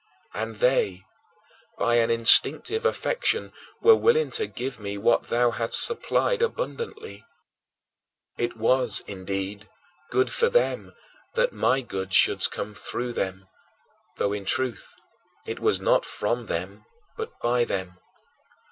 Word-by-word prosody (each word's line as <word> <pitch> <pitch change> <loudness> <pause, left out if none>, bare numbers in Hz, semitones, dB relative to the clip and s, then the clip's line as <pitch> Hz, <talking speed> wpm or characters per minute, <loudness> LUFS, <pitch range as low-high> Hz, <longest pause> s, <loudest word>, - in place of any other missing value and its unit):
And 110 +1 -4
they, 100 -5 +1 0.7
by 120 0 +2
an 115 -1 +2
instinctive 115 - +5
affection, 470 -1 -1 0.3
were 455 0 +7
willing 465 +1 +2
to 435 -1 0
give 130 -1 -6
me 100 -1 -5
what 115 +4 +2
thou 120 0 +2
hadst 115 -1 +2
supplied 475 0 0
abundantly. 465 -2 -4 1.1
It 120 -1 -3
was, 125 +3 +1
indeed, 95 +1 -5 0.4
good 390 -1 +1
for 470 0 +1
them - - 0 0.4
that - - +1
my 135 - +1
good 95 -6 -4
should - - +5
come 105 - -6
through 120 +3 -5
them, 95 -2 -4 0.7
though, 100 - 0
in 105 -1 -4
truth, 130 0 -1 0.5
it - - -5
was - - +1
not - - +2
from 115 +2 -3
them 95 +5 -5 0.3
but 450 +1 -7
by 120 0 +1
them. 95 -5 -4
120 Hz, 130 wpm, -25 LUFS, -, 1.1 s, were